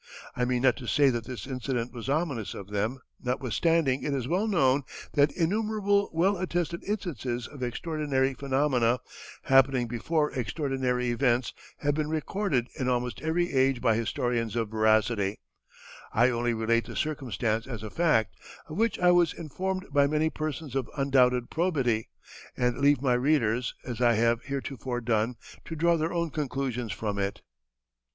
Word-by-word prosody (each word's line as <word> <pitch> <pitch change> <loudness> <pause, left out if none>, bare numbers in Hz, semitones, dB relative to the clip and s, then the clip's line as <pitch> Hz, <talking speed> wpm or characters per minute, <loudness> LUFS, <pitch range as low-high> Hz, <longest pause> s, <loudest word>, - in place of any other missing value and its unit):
I 125 - +1
mean 125 0 0
not 130 -2 +4
to 125 - -8
say 140 +1 +4
that 120 -2 -3
this 125 -2 -6
incident 125 -2 -3
was 120 +1 -6
ominous 140 - -1
of 100 0 -8
them, 110 +6 -1 0.2
notwithstanding 135 +3 +1
it 145 -2 -1
is 125 -3 -2
well 185 +8 +1
known 140 -9 +3 0.3
that 145 0 +4
innumerable 205 +2 +1
well 185 +5 +2
attested 175 -1 -2
instances 135 - -3
of 140 -3 -12
extraordinary 135 +1 -1
phenomena, 130 -3 +1 0.5
happening 135 -2 +4
before 150 +6 0
extraordinary 125 0 -1
events, 120 0 +1 0.3
have 145 0 +2
been 150 0 -1
recorded 155 - -1
in 130 -1 0
almost 125 -1 -1
every 170 +2 0
age 130 -1 +3
by 115 -3 +3
historians 115 0 -1
of 115 -2 -1
veracity; 110 -2 +2 0.7
I 120 +3 +4
only 120 0 0
relate 115 0 +1
the - - -8
circumstance 120 -7 -1
as 115 -5 -6
a 110 - -6
fact, 150 -10 +2 0.4
of 155 - -6
which 225 0 +1
I 180 0 +5
was 175 -2 +4
informed 185 +4 -4
by 140 -1 +4
many 155 +2 +1
persons 155 -2 -4
of 135 -2 -2
undoubted 125 -3 +3
probity, 135 -10 0 0.5
and 125 +1 0
leave 140 -1 +3
my 130 -3 +3
readers, 125 -3 +1
as 120 -2 -5
I 120 -1 +5
have 115 +1 +2
heretofore 135 -2 -4
done, 115 +1 0 0.3
to 165 - -6
draw 170 +2 +3
their 160 0 -1
own 170 -2 -1
conclusions 130 -6 -2
from 100 0 -3
it." 100 0 -3
130 Hz, 160 wpm, -28 LUFS, 120-155 Hz, 0.7 s, I